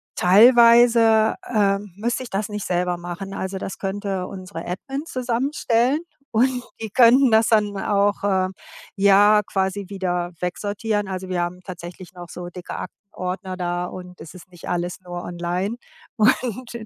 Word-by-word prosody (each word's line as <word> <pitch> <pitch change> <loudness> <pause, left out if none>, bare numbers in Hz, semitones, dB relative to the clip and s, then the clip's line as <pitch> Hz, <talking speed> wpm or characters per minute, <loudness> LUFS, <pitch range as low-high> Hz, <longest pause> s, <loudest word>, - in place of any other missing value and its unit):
teilweise, 230 +2 +6 0.2
ähm, 200 -1 +1
müsste 235 +4 -2
ich 245 - -9
das 200 +2 -2
nicht 210 -1 -5
selber 180 0 0
machen. 175 +3 -7
Also 190 +1 -4
das 195 - -6
könnte 195 -1 -3
unsere 185 -3 -8
Admin 270 - -5
zusammenstellen 255 0 0 0.3
und 250 +2 +1 0.2
die 220 - -4
könnten 250 +2 +6
das 220 +1 +4
dann 210 -2 +2
auch, 200 +1 +1
äh, 190 -2 +1 0.5
ja, 200 +2 +5
quasi 190 0 -1
wieder 180 -3 -2
wegsortieren. 205 +3 -2
Also 185 0 -5
wir 180 -1 -1
haben 180 +1 -5
tatsächlich 180 0 -9
noch 175 -2 -10
so 175 0 -7
dicke 180 0 -8
Aktenordner 185 -2 -6
da, 175 0 -2
und 180 0 -10
es 160 - -10
ist 185 - -13
nicht 175 - -10
alles 175 0 -2
nur 175 -1 -6
online. 175 +5 -3 0.4
Und 235 +2 +1
195 Hz, 150 wpm, -22 LUFS, 180-225 Hz, 0.5 s, teilweise